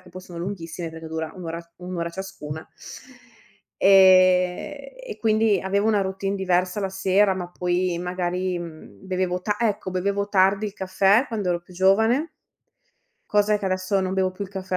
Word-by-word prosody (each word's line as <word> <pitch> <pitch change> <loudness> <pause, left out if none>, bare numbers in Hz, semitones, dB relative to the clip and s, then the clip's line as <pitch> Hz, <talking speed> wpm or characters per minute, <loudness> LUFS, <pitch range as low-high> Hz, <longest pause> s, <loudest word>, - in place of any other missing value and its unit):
che 185 - -18
poi 185 +1 -10
sono 175 -2 -10
lunghissime, 170 -3 -5
perché 160 0 -9
dura 160 0 -4
1 185 - -9
ora 165 0 -4 0.2
1 180 0 -6
ora 170 0 -2
ciascuna. 170 -5 -7 1.1
Ehm, 185 -2 +5 0.2
e - - -8
quindi 215 -3 +2
avevo 200 +2 0
una 215 -2 +3
routine 195 +1 -2
diversa 185 +1 0
la 195 - -1
sera, 190 +1 +2
ma 180 -2 -5
poi 180 0 0
magari, 180 0 -2
mhmm, 170 +2 -11
bevevo 185 -1 -1
tan 205 +2 -1
ecco 210 -4 0
bevevo 200 +2 -1
tardi 195 +1 +3
il 205 - -6
caffè, 195 +6 +2
quando 210 -5 -2
ero 175 -1 -1
più 180 - -18
giovane. 220 - +3 1.0
Cosa 210 0 +3
che 200 - -3
adesso, 185 +1 0
non 190 0 -2
bevo 190 -1 +1
più 185 +2 -7
il 195 - -5
caffè 190 -2 -4
185 Hz, 175 wpm, -24 LUFS, 180-200 Hz, 1.1 s, Ehm